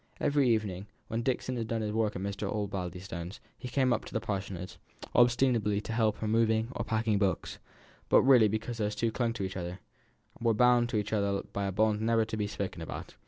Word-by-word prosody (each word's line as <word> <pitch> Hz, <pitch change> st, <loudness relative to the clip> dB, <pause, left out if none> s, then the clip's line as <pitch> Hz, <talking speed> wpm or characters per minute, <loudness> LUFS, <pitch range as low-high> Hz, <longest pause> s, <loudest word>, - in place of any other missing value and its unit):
Every 140 Hz, -3 st, +2 dB
evening, 105 Hz, -4 st, 0 dB, 0.2 s
when 115 Hz, +1 st, -1 dB
Dixon 130 Hz, 0 st, -1 dB
had 115 Hz, -2 st, -3 dB
done 115 Hz, -1 st, -1 dB
his 105 Hz, -, -2 dB
work 110 Hz, -1 st, 0 dB
at 95 Hz, -, -4 dB
Mr. 100 Hz, 0 st, -3 dB
Osbaldistone's, 90 Hz, -3 st, -4 dB, 0.2 s
he 130 Hz, -, -8 dB
came 130 Hz, 0 st, +2 dB
up 110 Hz, -, -1 dB
to -, -, -10 dB
the -, -, +2 dB
Parsonage, 95 Hz, -4 st, -5 dB, 0.4 s
ostensibly 120 Hz, -4 st, +3 dB
to 110 Hz, +2 st, -5 dB
help 110 Hz, -2 st, +2 dB
her -, -, -4 dB
in 105 Hz, -, 0 dB
moving 110 Hz, 0 st, +2 dB
or -, -, -3 dB
packing 110 Hz, -2 st, 0 dB
books, 100 Hz, -2 st, -1 dB, 0.5 s
but -, -, +6 dB
really 125 Hz, -5 st, +7 dB
because 110 Hz, +3 st, -3 dB
these 105 Hz, -1 st, -1 dB
two 115 Hz, +2 st, 0 dB
clung 120 Hz, 0 st, 0 dB
to 110 Hz, -, -4 dB
each 95 Hz, 0 st, -4 dB
other 90 Hz, 0 st, -4 dB, 0.6 s
were 115 Hz, -1 st, +2 dB
bound 120 Hz, 0 st, +4 dB
to 110 Hz, -, -1 dB
each 105 Hz, +1 st, -2 dB
other 100 Hz, -2 st, 0 dB
by 100 Hz, 0 st, -1 dB
a -, -, -1 dB
bond 105 Hz, +2 st, +2 dB
never 115 Hz, 0 st, +2 dB
to 110 Hz, -, -4 dB
be 105 Hz, -1 st, -1 dB
spoken 95 Hz, -4 st, -4 dB
about. 80 Hz, -, -7 dB
110 Hz, 215 wpm, -30 LUFS, 100-115 Hz, 0.6 s, really